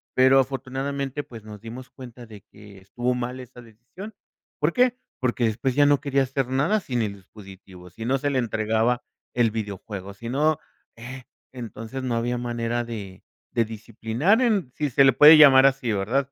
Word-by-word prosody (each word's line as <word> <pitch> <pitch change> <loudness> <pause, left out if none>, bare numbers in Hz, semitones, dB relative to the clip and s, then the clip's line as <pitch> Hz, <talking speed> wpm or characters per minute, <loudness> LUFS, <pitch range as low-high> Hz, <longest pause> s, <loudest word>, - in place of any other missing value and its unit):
pero 130 +1 +5
afortunadamente, 135 +1 -3
pues, 115 -3 -12
nos 105 -1 -11
dimos 120 +2 -9
cuenta 125 -2 -12
de 105 -3 -13
que 105 -1 -16
estuvo 120 +6 -2
mal 125 +1 -4
esa 125 0 -12
decisión. 120 - -12 0.5
¿Por 150 +3 +1
qué? 250 0 +2 0.2
Porque 125 -2 0
después 120 +4 -1
ya 145 0 +5
no 145 -1 +3
quería 140 -1 +1
hacer 135 0 -2
nada 155 +12 +1
sin 125 -6 -2
el 105 -2 -2
dispositivo. 95 -2 -14
Si 110 +6 -10
no 135 +2 +1
se 145 +2 -2
le 135 - 0
entregaba 110 +1 0 0.3
el 120 -2 +2
videojuego, 100 -2 -6
si 115 +4 -8
no, 150 +3 +1 0.4
eh, 130 +2 -9 0.3
entonces, 120 +1 -7
no 120 -2 -1
había 120 +1 -1
manera 120 0 -2
de 105 -5 -8 0.3
de 115 - +2
disciplinar 115 - -1
en 210 - +1
si 150 -1 -1
se 135 +2 +4
le 135 - +5
puede 150 +4 +9
llamar 135 -3 +8
así, 135 -4 +2
¿verdad? 125 +8 -1
125 Hz, 180 wpm, -24 LUFS, 110-135 Hz, 0.5 s, puede